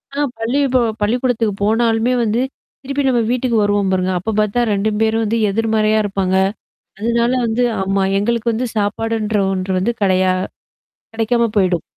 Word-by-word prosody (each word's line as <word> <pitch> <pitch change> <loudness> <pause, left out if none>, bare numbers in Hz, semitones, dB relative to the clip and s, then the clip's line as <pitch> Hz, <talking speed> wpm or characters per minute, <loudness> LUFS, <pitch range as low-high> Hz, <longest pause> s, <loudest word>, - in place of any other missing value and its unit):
ஆ - - -2 0.2
பள்ளிப்ப 260 +2 +1 0.2
பள்ளிக்கூடத்துக்கு 230 -1 0
போனாலுமே 225 +2 +2
வந்து, 225 +2 0 0.4
திருப்பி 275 +1 -2
நம்ம 245 -3 +2
வீட்டுக்கு 250 -2 0
வருவோம் 205 -1 +1
பாருங்க. 185 0 0
அப்ப 220 +5 -3
பாத்தா 210 +3 +1
2 200 +2 0
பேரும் 225 0 +1
வந்து 225 +2 0
எதிர்மறையா 220 +1 +1
இருப்பாங்க. 195 -2 -1 0.6
அதனால 235 +2 +1
வந்து 230 +2 0 0.2
ஆமா. 195 0 0 0.2
எங்களுக்கு 235 +2 0
வந்து, 245 +3 -2
சாப்பாடுன்ற 215 +1 -1 0.2
ஒன்று 185 0 -2
வந்து 235 +6 0
கடையா 185 -1 +2 0.8
கெடைக்காம 230 +1 +1
போயிடும். 180 -4 +2
220 Hz, 140 wpm, -18 LUFS, 200-235 Hz, 0.8 s, போனாலுமே